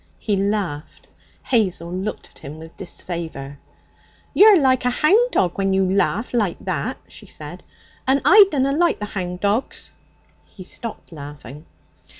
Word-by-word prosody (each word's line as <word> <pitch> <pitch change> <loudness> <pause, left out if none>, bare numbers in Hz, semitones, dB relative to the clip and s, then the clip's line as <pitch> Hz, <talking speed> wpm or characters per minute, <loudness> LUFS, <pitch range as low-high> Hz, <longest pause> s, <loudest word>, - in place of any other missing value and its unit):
He 210 - -1
laughed. 195 -7 -3 0.4
Hazel 185 -7 0
looked 190 +3 -5
at - - -16
him 145 +1 -9
with 160 +1 -12
disfavour. 160 -6 -6 0.7
'You're 410 -2 +7
like 260 -3 +3
a 250 - +2
hound 395 - +3
dog 180 - 0
when 195 0 +1
you 190 0 +2
laugh 200 +5 0
like 210 -8 0
to - - -18
that,' - - -2
she - - -13
said, - - -10 0.5
'and 270 +1 +4
I 405 +7 +9
dunna 275 -4 +1
like 340 +4 +2
the 210 - -4
hound 180 -3 -5
dogs.' 210 +5 -2 0.5
He 190 - -13
stopped 225 +3 -8
laughing. 145 -1 -10
200 Hz, 150 wpm, -21 LUFS, 170-255 Hz, 0.7 s, I